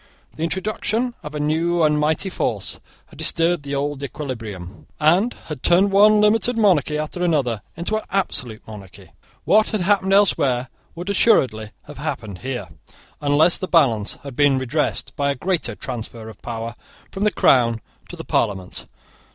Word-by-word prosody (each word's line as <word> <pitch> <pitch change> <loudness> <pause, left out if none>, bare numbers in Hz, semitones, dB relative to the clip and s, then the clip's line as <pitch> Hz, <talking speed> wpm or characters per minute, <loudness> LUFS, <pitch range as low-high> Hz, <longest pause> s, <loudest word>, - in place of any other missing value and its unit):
The - - -9
introduction 215 +7 -1
of 150 0 -8
a - - -3
new 165 +3 +1
and 150 -1 +3
mighty 155 +5 0
force - - -3 0.3
had - - -18
disturbed 170 0 +2
the 140 0 -4
old 145 0 -2
equilibrium, 115 -10 -7
and 180 +10 +3
had 150 -5 -7
turned 190 +3 +4
one 210 +2 +6
limited 225 +3 +2
monarchy 170 - +3
after 155 +3 -4
another 140 -11 +1 0.2
into 180 +6 -1
an 215 - -5
absolute 125 - -2
monarchy. 100 -4 -12 0.3
What 215 +1 +4
had 215 - -1
happened 190 +1 +2
elsewhere 135 -11 +3 0.3
would 175 +4 -4
assuredly 130 - +3
have - - -12
happened 100 -4 -5
here, 125 -8 -5 0.5
unless 150 +4 +3
the 185 - -3
balance 120 - +2
had 140 -3 -8
been 145 -1 +4
redressed 130 +4 -2
by 140 0 0
a 140 - 0
great 170 -2 -1
transfer 115 -2 -6
of 110 - -14
power 115 0 -5 0.4
from 195 - -4
the 210 - +4
crown 115 - +3 0.3
to - - -7
the - - -9
parliament. 95 -3 -2
150 Hz, 160 wpm, -21 LUFS, 120-185 Hz, 0.5 s, one